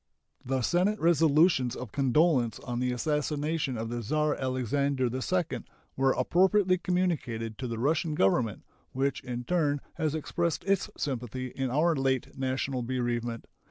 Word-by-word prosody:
The 130 0 -1
Senate 190 - +2
resolutions 160 -5 +4
of 125 -4 -7
condolence 135 -2 +2
on 120 -1 -4
the 125 0 0
assassination 150 +1 -1
of 115 +1 -3
the 120 0 -3
Czar 150 +6 +1
Alexander 130 +1 0
II 170 +6 -1 0.4
were 135 0 +3
appropriately 185 +6 +3
communicated 150 -13 -1
to 130 - -3
the 115 -1 -4
Russian 155 +5 0
Government, 105 0 +1 0.3
which 135 +2 -1
in 125 -1 -4
turn 150 -2 +1 0.2
has 155 -2 0
expressed 170 +2 -1
its 195 0 +1
sympathy 130 -1 -3
in 135 -1 -2
our 160 +6 +2
late 135 -2 -1
national 130 0 -2
bereavement. 120 -1 -2
135 Hz, 140 wpm, -29 LUFS, 125-160 Hz, 0.4 s, resolutions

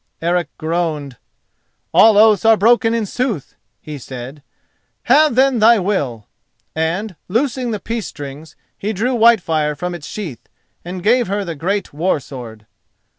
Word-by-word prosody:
Eric 175 0 0
groaned. 155 -5 -3 0.8
"All 220 -2 +6
oaths 215 -1 +5
are 225 -1 +5
broken 230 +2 +3
in 225 -2 -1
sooth," 220 - -3 0.2
he 150 -2 -8
said. 130 +3 -9 0.6
"Have 305 -5 +4
then 260 -1 +3
thy 230 +2 +6
will;" 145 - -2 0.5
and, 175 +6 -2
loosing 245 +4 -1
the 215 -2 -3
peace 225 +1 -4
strings, 145 +2 -9 0.2
he 210 +2 -3
drew 230 +6 -1
Whitefire 170 -10 +3
from 180 +4 -4
its 165 -4 -8
sheath 170 - -7 0.3
and 180 +1 -7
gave 240 +3 +3
her 200 +1 -2
the 170 - -4
great 190 +6 -3
war 160 +2 0
sword. 115 -6 -10
185 Hz, 145 wpm, -18 LUFS, 150-225 Hz, 0.8 s, All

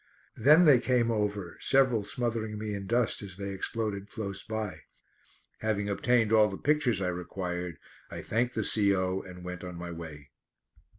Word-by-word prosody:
Then 155 +6 +6
they 140 -5 +7
came 120 -2 +2
over, 105 -4 -2
several 130 -5 +3
smothering 110 -1 -2
me 105 0 -4
in 100 -1 -5
dust 120 +1 +1
as 95 -3 -8
they 100 0 -4
exploded 105 0 -3
close 100 -3 -3
by. 110 -7 -4 0.8
Having 105 -2 -1
obtained 115 +2 +2
all 110 -1 +6
the 95 -2 -5
pictures 135 -9 +1
I 90 - 0
required 90 -1 -4 0.3
I - - -7
thanked 120 +3 0
the - - 0
C.O. 95 -3 +2
and 90 -1 -11
went 90 -1 -6
on 90 -1 -7
my 85 0 -6
way. 80 -4 -9
105 Hz, 165 wpm, -29 LUFS, 95-115 Hz, 0.8 s, they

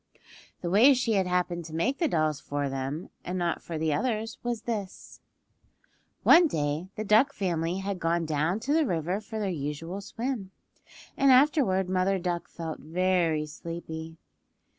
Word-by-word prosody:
The 175 - -2
way 245 +8 +7
she 245 -3 0
had 190 -3 +2
happened 180 -1 0
to 160 0 -8
make 250 +12 0
the 335 - +2
dolls 155 - 0
for 145 -1 -3
them 135 +5 -4
and 180 +1 -3
not 175 -2 -1
for 165 - -5
the 155 -1 0
others 225 - -2
was 240 -2 -3
this: 210 -5 -5 1.0
One 340 0 +7
day 150 - -2
the 215 - -3
duck 220 +7 +4
family 175 -4 -1
had 195 -1 -3
gone 165 0 0
down 155 +5 0
to 280 +5 0
the 315 -2 +3
river 175 +3 -1
for 220 +1 -7
their 205 -3 -1
usual 165 +5 -4
swim, 230 -1 -4 0.7
and 275 -1 +4
afterward 255 - +4
Mother 185 +1 +1
Duck 175 -1 -3
felt 165 -2 -6
very 170 -1 +1
sleepy. 160 +1 -7
180 Hz, 160 wpm, -28 LUFS, 160-215 Hz, 1.0 s, way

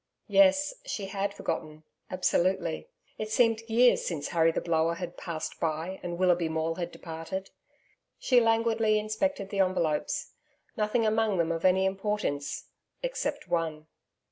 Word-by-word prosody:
Yes, 290 +6 +5
she 220 - -4
had 195 +1 -2
forgotten, 155 -5 -4 0.3
absolutely; 185 - 0 0.3
it 215 - -3
seemed 225 0 +3
years 240 +2 +5
since 150 -5 -3
Harry 165 -1 +3
the - - -1
Blower 165 0 +1
had 175 0 -6
passed 165 -2 -5
by 165 +3 -2
and 175 -1 -4
Willoughby 175 -2 +2
Maule 160 +1 -1
had 175 -1 -3
departed. 165 +3 -6 0.7
She 250 -2 +4
languidly 225 -1 +3
inspected 215 0 -1
the 200 - -2
envelopes. 170 -5 0 0.4
Nothing 220 +2 +1
among 215 -2 +2
them 170 -1 +1
of 165 +1 -2
any 190 +1 +4
importance 190 -7 -2 0.4
except - - -3
one. 165 -3 -1
190 Hz, 140 wpm, -29 LUFS, 165-220 Hz, 0.7 s, Yes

